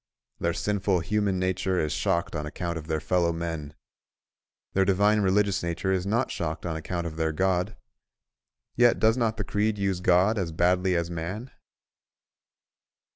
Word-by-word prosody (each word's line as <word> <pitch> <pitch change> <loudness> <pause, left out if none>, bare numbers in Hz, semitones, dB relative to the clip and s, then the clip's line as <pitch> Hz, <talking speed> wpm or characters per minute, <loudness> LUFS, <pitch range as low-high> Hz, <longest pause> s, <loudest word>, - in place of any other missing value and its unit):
Their 85 0 0
sinful 100 -3 0
human 100 +2 0
nature 95 0 0
is 75 - 0
shocked 85 -4 0
on 75 -1 -3
account 85 +2 -4
of 80 -1 -6
their 80 -1 0
fellow 85 +2 +1
men; 80 -3 -5 1.0
their 95 - +3
divine 100 +2 +3
religious 100 +1 +2
nature 85 +3 -2
is 95 0 0
not 115 +5 +1
shocked 80 0 -4
on 85 -2 -2
account 85 +2 -3
of 80 -1 -5
their 80 0 0
God: 95 +5 0 1.0
yet 120 0 +5
does 110 +1 +4
not 115 -3 0
the 105 - -2
creed 105 +2 0
use 95 -2 0
God 95 +4 +3
as 85 -4 -2
badly 90 +2 +2
as 85 0 -1
man? 90 +10 -5
90 Hz, 160 wpm, -27 LUFS, 85-100 Hz, 1.0 s, yet